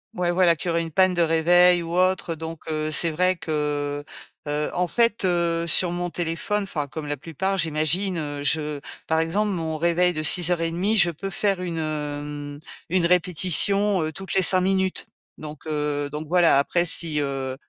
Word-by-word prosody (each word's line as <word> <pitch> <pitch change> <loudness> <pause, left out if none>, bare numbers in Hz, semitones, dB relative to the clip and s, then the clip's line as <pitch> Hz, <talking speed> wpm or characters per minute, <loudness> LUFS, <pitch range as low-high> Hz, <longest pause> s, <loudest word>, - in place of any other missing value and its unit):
Ouais, 175 -1 0
voilà, 175 -1 +3
qu'il 170 +2 -3
aurait 165 0 0
une 165 - -5
panne 185 +3 +3
de 175 - 0
réveil 175 +2 +4
ou 170 +1 -5
autre. 185 -2 +1
Donc, 160 0 -8
heu, 155 -1 -2
c'est 165 +2 +1
vrai 180 +3 +1
que, 145 -2 -3 0.4
heu, 150 +1 -2
en 180 0 0
fait, 230 +3 +1
heu, 170 -2 0
sur 175 +2 +4
mon 175 0 -3
téléphone, 175 +5 -2
enfin, 150 -7 -4
comme 155 +2 -7
la 145 0 -3
plupart, 175 +7 -3
j'imagine, 165 +3 0
heu, 145 -2 -4
je 150 0 -1 0.3
par 160 0 0
exemple, 200 +6 0
mon 160 -4 -3
réveil 170 +2 +1
de 155 - -3
6:30, 175 +5 +2
je 175 -3 +5
peux 185 +5 -6
faire 195 0 -1
une, 170 -2 -4
hem, 145 -1 -5 0.3
une 180 0 +1
répétition, 185 +3 +3
heu, 155 - -3
toutes 190 +4 -7
les 190 - +3
5 185 0 +3
minutes. 190 0 -1 0.3
Donc, 155 0 -10
heu, 150 -1 -2
donc, 150 +1 -6
voilà, 170 -3 +4
après, 170 +5 +1
si, 165 -3 +3
heu, 135 -2 -3
165 Hz, 185 wpm, -23 LUFS, 155-180 Hz, 0.4 s, je